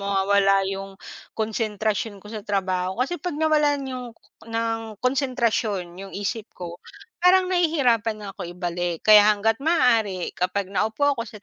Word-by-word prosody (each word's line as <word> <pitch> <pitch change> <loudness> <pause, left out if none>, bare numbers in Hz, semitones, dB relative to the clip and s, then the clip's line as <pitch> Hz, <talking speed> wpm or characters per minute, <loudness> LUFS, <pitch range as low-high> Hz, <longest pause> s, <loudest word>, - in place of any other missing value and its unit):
mawawala 195 0 +2
yung 195 0 -7 0.4
konsentrasyon 215 -2 -2
ko - - -11
sa 215 - -5
trabaho 185 -1 -1
kasi 330 +4 -4
pag 350 -4 -4
nawalan 295 -3 +2
yung 250 -1 -5 0.4
ng 225 -1 -3
konsentrasyon 230 -9 0
yung 195 0 -9
isip 205 +2 -3
ko, 175 -1 -8 0.4
parang 365 +1 +4
nahihirapan 275 - +2
na 200 - -6
ko - - -4
ibalik 175 -1 -3
kaya 210 -1 +8
hangga't 225 +2 0
maaari 230 - +2
kapag 185 +2 -1
naupo 220 +7 -1
ako 235 -4 -3
sa 210 -1 -12
215 Hz, 140 wpm, -24 LUFS, 195-250 Hz, 0.4 s, kaya